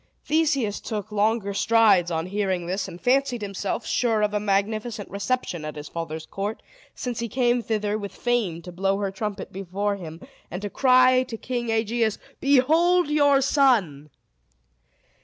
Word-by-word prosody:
Theseus 285 -9 +1
took 215 -1 -5
longer 210 0 +1
strides 210 -5 +4
on 165 -1 -2
hearing 190 -2 -1
this, 185 +3 -2
and 170 - -9
fancied 250 -1 +1
himself 195 0 -3
sure 225 -3 +1
of 210 0 0
a 210 - +1
magnificent 210 +2 -1
reception 200 -4 -2
at 155 0 -6
his 150 0 -8
father's 160 -1 -5
court, 205 +3 -5 0.3
since 245 -2 -4
he 235 0 -3
came 245 0 +1
thither 215 -2 -1
with 200 -2 -6
Fame 215 -9 -1
to 180 - -8
blow 195 +2 0
her 200 -1 -2
trumpet 205 +1 -5
before 195 +2 -2
him, 165 -3 -9 0.3
and 200 +3 -5
cry 255 -1 +5
to 245 -3 -5
King 240 0 -3
Aegeus, 225 0 0 0.2
"Behold 315 +6 +3
your 285 -2 +4
son!" 225 - +2
210 Hz, 155 wpm, -24 LUFS, 195-245 Hz, 0.3 s, cry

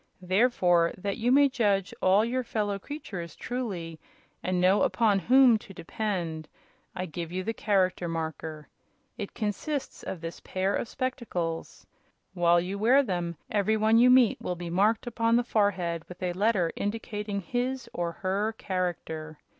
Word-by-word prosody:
Therefore, 180 -4 +3
that 200 +1 -3
you 240 +2 +1
may 285 +2 +6
judge 205 -7 0
all 195 +4 +4
your 255 +2 -1
fellow 205 -3 -2
creatures 190 - -7
truly, 190 -11 -4 0.4
and 185 0 -1
know 185 +3 +4
upon 215 -4 +3
whom 245 +2 +5
to 195 -2 -13
depend, 170 -5 -3 0.5
I 185 0 -3
give 165 0 -6
you 185 +1 -3
the 225 - -2
Character 185 -5 +1
Marker. 160 -2 -5 0.5
It 200 - -6
consists 255 +7 -3
of 185 - -5
this 165 +1 -7
pair 190 +1 -1
of - - -2
spectacles. 215 -12 -4 0.5
While 175 -1 +4
you 190 +3 -3
wear 255 +6 +5
them 175 - -3
every 215 +1 +2
one 220 +1 +4
you 250 +1 +6
meet 250 -3 +5
will 180 - -2
be 175 -1 -6
marked 210 +6 +2
upon 230 -1 +1
the 240 - +3
forehead 185 -7 0
with 180 +1 -9
a 180 -1 0
letter 190 -3 +1
indicating 210 -1 -3
his 245 +5 -2
or 170 -1 -2
her 200 +5 -1
character. 160 -4 -3
195 Hz, 155 wpm, -28 LUFS, 175-225 Hz, 0.5 s, may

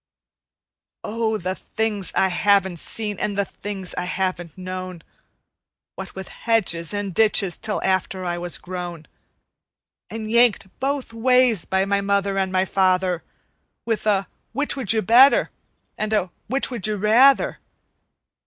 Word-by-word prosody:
Oh, 220 0 -1
the 185 -1 -3
things 210 -1 -1
I 190 - +3
haven't 190 -1 +2
seen 210 0 -3
and 205 -1 -2
the 200 - +1
things 195 -3 -5
I - - -3
haven't 180 -3 -3
known, 185 -2 -6 0.9
What 190 0 -9
with 190 0 -7
hedges 185 -8 -1
and 205 -2 -3
ditches 205 -3 +3
till 215 - -2
after 190 0 -1
I 175 0 -2
was 175 0 -2
grown, 175 -3 -7 1.0
And 220 0 -5
yanked 235 -4 +3
both 275 -3 -2
ways 250 -4 +3
by 190 0 +1
my 200 0 0
mother 200 0 0
and 190 -1 -1
my 185 0 +2
father, 185 -2 +1 0.6
With 225 -2 -2
a 195 -2 +2 0.3
'Which 290 +1 -1
would 260 -8 -1
you 220 -1 +1
better?" 245 +7 +6 0.5
and 215 0 -1
a 190 -4 0 0.2
"Which 270 +3 -1
would 230 -5 -3
you 215 - -1
rather?" 230 +7 +4
200 Hz, 145 wpm, -22 LUFS, 185-220 Hz, 1.0 s, better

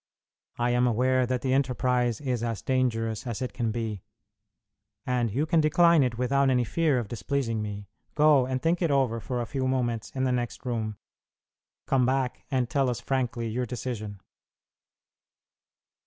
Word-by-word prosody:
I 120 0 +1
am 125 +1 +3
aware 125 +2 +2
that 125 -1 -2
the 130 -1 +1
enterprise 125 -3 +1
is 125 -5 -1
as 115 -3 -3
dangerous 115 -3 0
as 115 -3 -3
it 130 - -4
can 120 -3 -1
be, 110 -4 -3 1.0
and 125 -2 0
you 135 +9 0
can 160 0 +3
decline 170 +1 +5
it 125 -3 0
without 135 +2 +2
any 125 -1 +3
fear 150 +4 +1
of 120 -4 -2
displeasing 115 +1 -2
me. 105 -1 -6 0.3
Go, 150 -4 +5
and 130 0 -1
think 165 +5 0
it 170 - +2
over 130 -5 +1
for 120 +3 -3
a - - -2
few 130 +3 -2
moments 120 -4 -1
in 130 - -1
the 130 - +2
next 120 +1 -3
room; 110 -4 -2 0.9
come 130 -2 +2
back 130 -1 -1
and 130 -2 0
tell 135 +1 +1
us 120 - -2
frankly 125 -3 -2
your 125 +2 -2
decision." 110 -4 -5
125 Hz, 170 wpm, -27 LUFS, 115-130 Hz, 1.0 s, decline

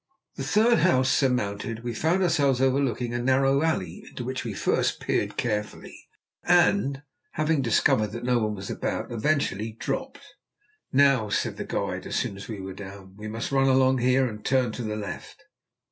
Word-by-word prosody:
The 135 - -5
third 215 - +3
house 130 -6 +3
surmounted, 115 -3 0
we 120 -1 -3
found 165 - +1
ourselves 145 -7 +2
overlooking 130 -3 +1
a 120 - -1
narrow 135 +2 +3
alley, 165 +6 -2
into 125 - -7
which 130 +2 -4
we 115 - -4
first - - 0
peered - - -1
carefully, 105 -3 -4 0.4
and, 175 -5 +3 0.3
having 155 -1 +1
discovered 110 -3 +2
that 120 0 -6
no 125 -1 +2
one 105 -1 -1
was 95 -1 -6
about, - - -3
eventually 115 -4 -1
dropped. 265 - -4 0.7
"Now," 135 -5 +4
said - - -1
the - - -4
guide, - - -3
as - - -4
soon - - -1
as 100 - -9
we 110 -3 -6
were 95 0 -6
down, 95 0 -11
"we 105 +1 -8
must 115 +4 -4
run 135 0 +3
along 130 0 +4
here, 130 +2 +3
and 105 -3 -6
turn 130 -3 +1
to 120 - -6
the 105 -1 -3
left." 105 -1 -7
125 Hz, 175 wpm, -26 LUFS, 110-140 Hz, 0.7 s, Now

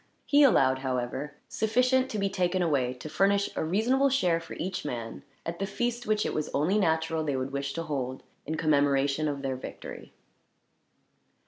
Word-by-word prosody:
He 290 0 +4
allowed, 130 - +5
however, 130 +2 -3
sufficient 255 +4 +2
to 215 - -3
be 200 -1 +1
taken 185 -1 0
away 135 -7 +1
to 125 - -8
furnish 200 +5 +2
a - - -1
reasonable 235 - +2
share 180 -11 +2
for 165 - -9
each 185 +2 -4
man, 120 -5 -5 0.2
at 170 +1 -4
the 195 - -1
feast 240 +3 -2
which 215 0 +1
it - - -1
was 155 - -2
only 175 +9 +2
natural 160 -3 +1
they 145 -3 -1
would 130 +1 -3
wish 140 0 -3
to 165 - -3
hold, 130 -4 -3 0.2
in 160 - -1
commemoration 145 -1 +2
of 140 -1 -3
their 135 -1 -1
victory. 130 - -9
160 Hz, 180 wpm, -28 LUFS, 140-200 Hz, 0.2 s, allowed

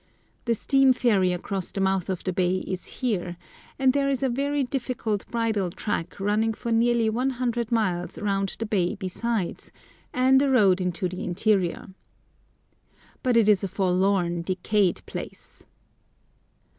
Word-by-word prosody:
The 235 -1 +2
steam 270 +3 +4
ferry 205 -8 +2
across 185 +1 -2
the - - -5
mouth 190 -1 +1
of 185 -2 -3
the 185 - -2
bay 185 +1 +1
is 185 -1 -4
here, 180 -9 -2 0.4
and 265 -1 +3
there 280 0 +1
is 275 -1 -1
a 265 - +2
very 280 +3 0
difficult 245 -5 -3
bridle 220 -5 0
track 175 -1 -4
running 215 +3 +1
for 235 - -4
nearly 230 0 +3
100 240 0 -1
miles 185 -6 0
round 195 -1 -1
the 225 - -3
bay 200 -2 0
besides, 200 0 -3 0.4
and 260 +1 +4
a 280 - +2
road 200 -8 +4
into 180 0 -1
the 180 +1 -6
interior. 185 -1 0 1.3
But 250 -2 +2
it 225 -3 +4
is 205 -3 +4
a - - 0
forlorn, 185 -2 +1
decayed 185 +2 0
place. - - -9
210 Hz, 145 wpm, -25 LUFS, 185-240 Hz, 1.3 s, steam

